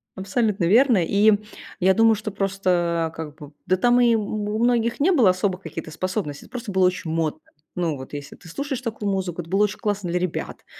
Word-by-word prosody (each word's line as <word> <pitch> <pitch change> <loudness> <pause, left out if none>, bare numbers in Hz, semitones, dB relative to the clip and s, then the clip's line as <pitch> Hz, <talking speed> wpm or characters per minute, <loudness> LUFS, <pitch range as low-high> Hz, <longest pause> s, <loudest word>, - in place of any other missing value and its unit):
Абсолютно 195 0 0
верно. 235 +6 +5
И 205 +4 +4 0.5
я 190 +1 +4
думаю, 225 +1 +5
что 215 0 -5
просто, 175 -4 0
как 155 -2 -7
бы, 150 -1 -12
да, 185 +1 +2
там 245 +3 +4
и 235 -1 +5
у 210 0 -2
многих 235 0 +1
не 335 +7 +3
было 255 - +5
особо 185 +1 0
каких-то 165 -3 -8
способностей, 185 -3 -4
это - - -31
просто 235 -4 -5
было 190 -1 +3
очень 180 -2 -3
модно. 160 -1 -1 0.4
Ну, 170 -4 -1
вот 130 0 -10
если 145 -1 -7
ты 170 - -15
слушаешь 275 - -4
такую 220 -4 -3
музыку, 185 -3 -2
это 165 - -13
было 195 +2 +3
очень 210 0 -1
классно 205 -4 -2
для 180 - 0
ребят, 180 -2 -4
190 Hz, 205 wpm, -23 LUFS, 170-220 Hz, 0.5 s, верно